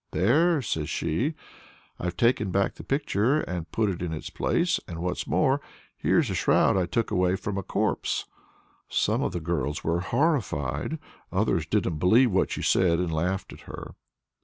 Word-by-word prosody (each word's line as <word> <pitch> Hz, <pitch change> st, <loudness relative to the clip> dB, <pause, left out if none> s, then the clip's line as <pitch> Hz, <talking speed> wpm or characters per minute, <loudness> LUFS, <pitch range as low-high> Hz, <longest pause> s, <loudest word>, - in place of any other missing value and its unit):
"There!" 145 Hz, -, +3 dB
says 80 Hz, -8 st, -2 dB
she, 125 Hz, -, -1 dB, 0.6 s
"I've 90 Hz, 0 st, -3 dB
taken 115 Hz, -3 st, +2 dB
back 100 Hz, +1 st, +1 dB
the -, -, -11 dB
picture 135 Hz, 0 st, +1 dB
and 85 Hz, -3 st, -5 dB
put 110 Hz, -1 st, +1 dB
it 90 Hz, -3 st, -3 dB
in 90 Hz, -2 st, -2 dB
its 75 Hz, -, -6 dB
place; 170 Hz, 0 st, +1 dB
and, 85 Hz, -, -6 dB
what's 90 Hz, +2 st, -3 dB
more, 130 Hz, -, +2 dB, 0.3 s
here's -, -, +2 dB
a -, -, -1 dB
shroud -, -, +3 dB
I 95 Hz, -2 st, +1 dB
took 115 Hz, +7 st, -1 dB
away 90 Hz, 0 st, +2 dB
from 100 Hz, +1 st, -4 dB
a 100 Hz, -, -1 dB
corpse." -, -, -1 dB, 0.6 s
Some -, -, +1 dB
of -, -, 0 dB
the 85 Hz, -, -3 dB
girls 75 Hz, -3 st, -2 dB
were 85 Hz, +1 st, +1 dB
horrified; 95 Hz, -, 0 dB, 0.3 s
others 95 Hz, -5 st, +1 dB
didn't 90 Hz, -7 st, 0 dB
believe 115 Hz, +8 st, +5 dB
what 95 Hz, -, +2 dB
she -, -, -4 dB
said, 85 Hz, -3 st, +3 dB
and 85 Hz, -2 st, -1 dB
laughed 90 Hz, +4 st, -1 dB
at -, -, -12 dB
her. -, -, -8 dB
95 Hz, 175 wpm, -26 LUFS, 85-115 Hz, 0.6 s, believe